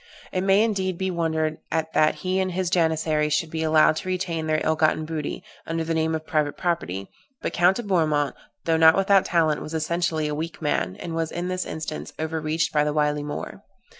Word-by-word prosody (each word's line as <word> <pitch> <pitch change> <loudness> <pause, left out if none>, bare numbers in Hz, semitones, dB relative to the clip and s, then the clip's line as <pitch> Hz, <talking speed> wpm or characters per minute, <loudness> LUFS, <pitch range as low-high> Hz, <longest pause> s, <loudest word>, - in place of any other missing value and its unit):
It 185 - -1
may, 195 +2 +4
indeed, 190 -5 -1
be 190 0 -1
wondered 160 -2 -1
at 160 0 -1
that 155 0 +3
he 185 +1 +1
and 185 -1 -1
his 180 -1 -1
Janissaries 160 -3 +1
should 160 -2 -1
be 160 - -3
allowed 155 0 +4
to - - -5
retain 175 -3 -2
all - - -5
their 155 0 +1
ill 160 - +2
gotten 155 0 +2
booty, 155 -2 -4 0.2
under 165 0 -1
the 165 0 -2
name 160 0 +1
of 155 0 -5
private 150 -2 0
property; 100 - -2 0.4
but - - -2
Count 175 +2 +4
de 240 - -4
Bourmont, 155 -7 +1 0.3
though 165 -1 +2
not 160 0 +7
without 195 0 +4
talent, 160 -3 +2
was 155 - -6
essentially 160 -1 0
a 150 - -2
weak 160 +3 -4
man, 95 - -1
and 165 - -6
was 165 -1 -2
in 175 +1 -3
this 185 0 -2
instance 155 -1 -5
overreached 160 0 -1
by 150 -1 +3
the 150 0 0
wily 150 -1 +1
Moor. 145 0 -6
160 Hz, 215 wpm, -24 LUFS, 155-175 Hz, 0.4 s, not